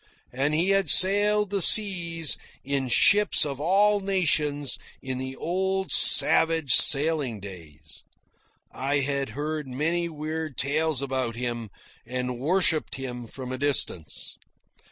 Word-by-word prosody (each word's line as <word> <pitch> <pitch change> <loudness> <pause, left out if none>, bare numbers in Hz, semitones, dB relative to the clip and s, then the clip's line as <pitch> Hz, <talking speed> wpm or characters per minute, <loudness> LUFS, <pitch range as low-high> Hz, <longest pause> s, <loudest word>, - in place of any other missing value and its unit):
And 140 +4 -2
he 170 +5 0
had 195 0 0
sailed 205 +1 +5
the 200 -1 -2
seas 170 -7 +4 0.3
in 135 -1 -3
ships 205 +8 +2
of 140 -2 -7
all 205 +6 +1
nations 155 -8 -2 0.2
in 130 -1 -7
the 130 0 -7
old 190 +4 -4
savage 160 -4 +5
sailing 145 -6 +2
days. 85 -6 -14 0.7
I 140 +2 -3
had 140 -1 -3
heard 150 -1 -5
many 165 +6 -3
weird 155 -1 -7
tales 150 0 -2
about 130 -4 -4
him, 120 -2 -6 0.3
and 125 0 -6
worshipped 160 +1 -1
him 125 -3 -8
from 130 +1 -10
a 130 - -7
distance. 130 - -2
150 Hz, 125 wpm, -23 LUFS, 130-175 Hz, 0.7 s, sailed